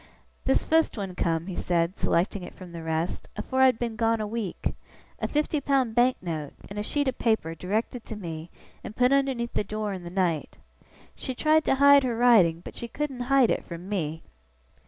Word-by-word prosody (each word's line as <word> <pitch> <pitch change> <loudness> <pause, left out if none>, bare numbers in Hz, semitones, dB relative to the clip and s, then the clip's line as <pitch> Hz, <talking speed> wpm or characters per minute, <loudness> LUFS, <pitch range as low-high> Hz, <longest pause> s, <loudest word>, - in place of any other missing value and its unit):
'This 265 - +2
fust 320 -5 +2
one 195 -3 -4
come,' 165 -2 0
he 185 -1 -5
said, 170 +1 0
selecting 185 +3 0
it 180 - -9
from 185 -2 -11
the 170 -1 -7
rest, 160 +1 -2
'afore 260 0 -1
I 265 - +8
had 250 -3 +2
been 235 -2 -3
gone 225 0 +1
a 215 - -1
week. 210 -3 -3 0.5
A - - -1
fifty 300 0 0
pound 265 -4 +1
Bank 245 +2 +3
note, 155 -5 -4 0.2
in 205 - -4
a - - 0
sheet 285 +6 -1
of 260 - -2
paper, 220 -8 +1
directed 215 +7 -2
to 220 - -6
me, 165 -4 -6 0.3
and 215 - -8
put 250 +1 +3
underneath 270 -4 +1
the - - 0
door 210 0 -3
in 185 - -6
the 170 - -7
night. 175 -4 -1 0.6
She 260 - -5
tried 310 +3 +3
to - - +3
hide 280 +1 +7
her 240 -3 -1
writing, 205 -9 +5
but - - -8
she 235 - -5
couldn't 275 +1 -4
hide 270 -4 +5
it - - -1
from 170 +1 -8
Me! 160 -6 -3
215 Hz, 210 wpm, -27 LUFS, 175-255 Hz, 0.6 s, I